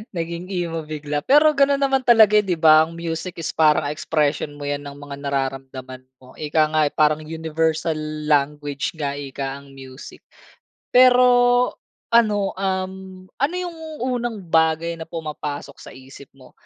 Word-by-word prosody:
Naging 170 +1 -4
emo 170 -3 -3
bigla. 150 -1 -4
Pero 300 +3 +5
ganun 280 0 +3
naman 270 -1 +2
talaga, 220 -3 +6
'di 190 -4 -1
ba? 155 0 +6
Ang 165 +1 -11
music 170 +1 -5
is 160 - -3
parang 155 -1 +3
expression 150 -1 -1
mo 145 - -9
yan 145 0 -3
ng 140 0 -9
mga 145 0 -9
nararamdaman 135 -2 -4 0.2
mo. 130 0 -17
Ika 155 0 +1
nga 155 0 +2
parang 155 0 +2
universal 160 0 -2 0.3
language 145 0 0
nga 140 -3 -2
ika 135 0 -5
ang 140 -1 -17
music. 130 0 -12 0.7
Pero 250 0 +6 0.9
ano, 210 -4 +3
um, 190 -1 -4 0.2
ano 295 +6 +1
yung 350 -2 -5 0.3
unang 240 -3 -2
bagay 165 0 +1
na 160 - -8
pumapasok 150 -3 -6
sa - - -12
isip 135 +1 -14
mo 130 -1 -17
160 Hz, 150 wpm, -21 LUFS, 145-190 Hz, 0.9 s, talaga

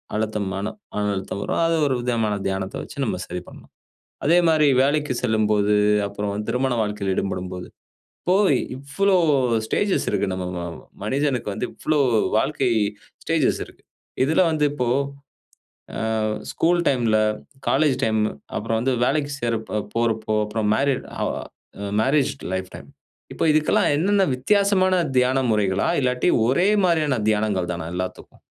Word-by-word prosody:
அழுத்தம் 105 -2 -1
மன 95 +1 -3 0.3
மன 105 0 0
அழுத்தம் 95 0 -4
வரும் - - -1
அது 165 - +2
ஒரு 135 -2 +1
விதமான 115 -3 0
தியானத்த 95 0 -3
வச்சு - - -11
நம்ம - - -2
சரி 90 0 -5
பண்ணலாம். - - -14 0.5
அதே 170 +4 +5
மாரி 155 -2 +4 0.2
வேலைக்கு 145 0 +1
செல்லும்போது, 105 -3 +2 0.3
அப்புறம் 100 +1 -3
திருமண 125 +2 0
வாழ்க்கையில 105 -2 -2
ஈடுபடும்போது, 90 -2 -3 0.6
இப்போ 180 - +2 0.4
இவ்வளோ 190 +9 0 0.5
ஸ்டேஜ்ஸ் 200 - 0
இருக்கு - - 0
நம்ம 90 -1 -4 0.6
மனிதனுக்கு 130 +2 -1
வந்து 125 - -2
இவ்வளோ 155 -1 0 0.4
வாழ்க்கை 135 0 0 0.5
ஸ்டேஜ்ஸ் - - +1
இருக்கு. - - -19 0.4
இதுல 160 +6 +3
வந்து 155 -2 +1
இப்போ 125 -4 -1 1.1
ஆ - - -3 0.5
ஸ்கூல் 175 +1 +2
டைம்ல, 120 -5 +2 0.5
காலேஜ் 140 -1 +3
டைம் 110 -1 +1 0.4
அப்புறம் 115 +1 -1
வந்து 130 +3 +1
வேலைக்கு 145 +2 0
சேர 120 -1 0 0.4
போறப்போ, 115 -2 0
அப்புறம் 105 0 -2
மேரேட் 135 +3 0
ஹ - - -2 0.8
மேரேஜ் 140 +3 +2 0.2
லைஃப் 95 0 -4
டைம் - - -12 0.4
இப்ப - - -2
இதுக்கெல்லாம் 155 0 +2
என்னென்ன 195 +5 +3
வித்தியாசமான 190 +6 +2 0.2
தியான 125 +1 +3
முறைகளா, 100 -3 +1
இல்லாட்டி 125 +3 +1 0.2
ஒரே 155 +10 +3 0.2
மாரியான 155 -6 +2
தியானங்கள் 105 -4 0
தானா 85 -2 -5
எல்லாத்துக்கும்? 90 0 -6
125 Hz, 130 wpm, -23 LUFS, 105-150 Hz, 1.1 s, அதே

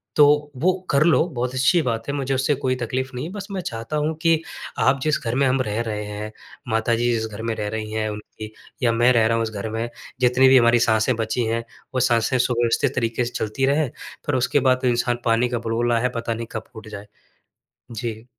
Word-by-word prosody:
तो 150 0 +4
वो 185 +2 +4 0.2
कर 140 +1 +4
लो 170 -1 +5
बहुत 125 -5 -3
अच्छी 135 +7 +3
बात 115 -4 -2
है, - - -1
मुझे 135 -1 -1
उससे 135 +3 +1
कोई 130 -1 -1
तकलीफ 130 +2 -3
नहीं 125 +4 -3
है। 170 - -6
बस 200 -1 -6
मैं 190 -2 -3
चाहता 115 +3 -4
हूँ 150 +2 0
कि 165 -2 +3 0.4
आप 135 +1 +3
जिस 155 0 +2
घर 115 +2 -1
में 135 0 +3
हम 130 0 +2
रह 105 -1 -1
रहे 105 -2 -3
हैं 105 +1 -6 0.4
माता 110 +1 +2
जी 120 +1 +1
जिस 110 -1 -1
घर 110 0 -8
में 115 0 -1
रह 105 - -3
रही 110 0 -4
हैं 110 0 -1
उनकी 105 +1 -8 0.3
या 115 - +4
मैं 120 +2 +4
रह 115 -2 +4
रहा 115 0 +1
हूँ 115 - +1
इस 110 - -5
घर 105 +1 -4
में, 115 +1 -3 0.3
जितनी 125 +2 +5
भी 130 0 +7
हमारी 120 0 +5
साँसें 110 +2 +2
बची 115 +1 -1
हैं, 115 +1 -1 0.3
वो - - +2
साँसें 120 +1 +2
सुव्यवस्थित 120 +2 +1
तरीके 115 0 0
से 120 - -4
चलती 110 +5 -1
रहे, 145 +1 +2 0.4
पर 145 - +1
उसके 130 +3 +2
बाद 130 0 +2
तो 130 - +1
इंसान 120 0 0
पानी 115 +1 +2
का 120 -2 -1
बुलबुला 115 +1 0
है, 125 +1 +1
पता 115 0 -2
नहीं 115 0 -5
कब - - -4
फूट 110 -1 -10
जाए। 105 -1 -9 0.8
जी। 110 0 -5
120 Hz, 235 wpm, -22 LUFS, 115-130 Hz, 0.8 s, भी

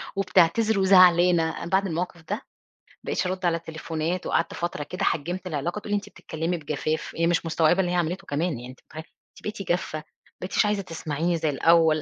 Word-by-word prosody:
وبتعتذر 195 +3 +3
وزعلانة، 180 -3 +5
أنا - - -4
بعد 195 +2 +2
الموقف 170 0 -3
ده 160 +6 -3
ما - - -10 0.6
بقيتش - - -1
أَرُد 185 0 -3
على 170 -1 +2
تليفونات 160 +1 -4
وقعدت - - 0
فترة 170 -3 -3
كده 180 +6 -5
حجِّمت 175 +4 -1
العلاقة، 170 +4 -2
تقول 210 - -8
لي: - - +3
"أنتِ 205 0 -3
بتتكلمي 165 -2 -4
بجفاف"، 155 0 -3
إيه 165 0 +1
مش 170 0 +1
مستوعبة 165 +2 +2
اللي 180 -2 +1
هي - - 0
عملِته 175 +1 -1
كمان، 155 +5 0
يعني 120 - -8
أنت 130 - -12
متخيل! 155 0 -9 0.3
"أنتِ - - -18
بقيتِ 210 -1 -5
جافة، 175 -3 0
ما 155 - -14 0.4
بقيتيش 185 +3 +1
عايزة 210 -1 +1
تسمعيني 165 -1 -2
زي 160 -1 0
الأول"، 160 +2 +4
170 Hz, 200 wpm, -25 LUFS, 160-185 Hz, 0.6 s, وزعلانة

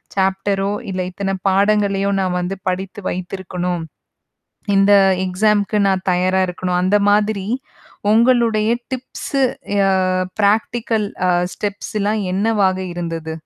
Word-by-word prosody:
சாப்டரோ 195 +1 0 0.2
இல்ல 185 0 -2
இத்தன 195 +1 -2
பாடங்களையோ! 200 0 +2
நான் 180 -1 -1
வந்து 180 +2 -3
படித்து 190 +3 -4
வைத்திருக்கணும். 180 -1 -4 0.9
இந்த 195 +1 +5 0.3
எக்ஸாமுக்கு 205 +3 +1
நான் 190 0 -1
தயாரா 185 +1 +2
இருக்கணும், 180 0 -2
அந்த 190 +3 +3
மாதிரி 205 -1 +1 0.7
உங்களுடைய 230 -2 +3 0.2
டிப்ஸு 260 +2 -3 0.4
ஆ - - +3 0.5
ப்ராக்டிகல் 220 +1 +1 0.2
ஆ - - +4 0.2
ஸ்டெப்ஸ்லாம் 205 +1 -2
என்னவாக 200 -1 +1 0.2
இருந்தது? 165 -2 -4
195 Hz, 105 wpm, -19 LUFS, 185-210 Hz, 0.9 s, இந்த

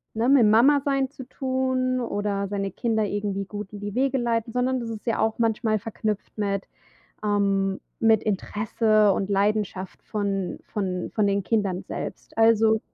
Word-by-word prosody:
ne, 230 +3 +1
mit 270 -4 +6
Mama 240 +7 +6
sein 275 -2 +1
zu 275 -2 -10
tun 260 -1 0
oder 205 -3 -2
seine 195 0 -2
Kinder 220 0 0
irgendwie 200 -1 -2
gut 205 0 -7
in 205 - -7
die 205 0 -5
Wege 270 +1 +2
leiten, 230 -1 -1
sondern 255 +1 +1
das 235 -1 -5
ist 220 0 -8
ja 230 - +1
auch 220 +1 0
manchmal 225 -1 +1
verknüpft 215 0 -4
mit 200 -2 -1 0.6
ähm, 195 -2 +1 0.2
mit 225 -2 +4
Interesse 215 +1 +2
und 195 +1 -1
Leidenschaft 200 -2 -1
von 200 -4 -2
von 185 -4 -3
von 210 -2 +2
den 200 0 +1
Kindern 195 -2 0
selbst. - - -7
Also 225 -1 +5
215 Hz, 160 wpm, -25 LUFS, 200-230 Hz, 0.6 s, mit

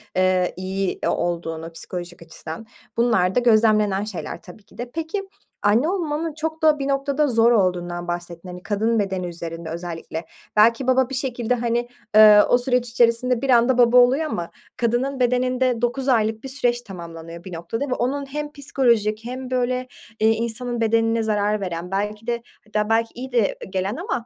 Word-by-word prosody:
eee, 185 -1 +2
iyi 190 0 -2
o - - +2
olduğunu 165 -1 -2
psikolojik 175 +1 -6
açıdan 165 +4 -9 0.3
bunlar 190 -6 +2
da - - +5
gözlemlenen 215 -4 +3
şeyler 175 -5 -6
tabii 185 +3 -14
ki 200 - -21
de. 240 +1 -6
Peki 330 +6 -4 0.4
anne 230 +10 +3
olmanın 325 -4 -2
çok 320 +1 -4
da 305 -2 +4
bir 275 - -2
noktada 280 +1 +1
zor 230 -2 +4
olduğundan 175 -4 0
bahsettin 175 0 -5
hani 180 0 -9
kadın 220 +2 0
bedeni 190 -3 -2
üzerinde 165 -1 -6
özellikle. 165 -1 -6 0.3
Belki 230 +4 +4
baba 260 -1 +3
bir 270 - -4
şekilde 250 -2 -1
hani, 240 0 -1 0.3
ııı, 210 -1 +9
o 245 - +5
süreç 250 -1 +1
içerisinde 235 +1 +2
bir 275 - -2
anda 245 +1 +4
baba 245 0 +5
oluyor 255 +5 +5
ama 175 - -4 0.3
kadının 245 +4 0
bedeninde 250 -1 +1
dokuz 255 +3 0
aylık 220 -2 +1
bir 270 - -5
süreç 245 -3 +1
tamamlanıyor 170 -4 -9
bir 185 - -9
noktada 170 +11 -3
ve 255 - -1
onun 275 +3 -1
hem 295 +2 -5
psikolojik 235 -7 0
hem 255 +1 -6
böyle, 255 0 0 0.3
eee, 220 - +4
insanın 235 +2 -1
bedenine 225 0 +2
zarar 210 -1 0
veren 180 -1 -4
belki 210 +3 -3
de 235 -1 -2 0.2
hatta 210 0 -1
belki 225 0 +2
iyi 260 +2 -7
de 235 -5 +1
gelen 190 +3 -2
ama 255 -3 -3
230 Hz, 175 wpm, -22 LUFS, 190-250 Hz, 0.4 s, ııı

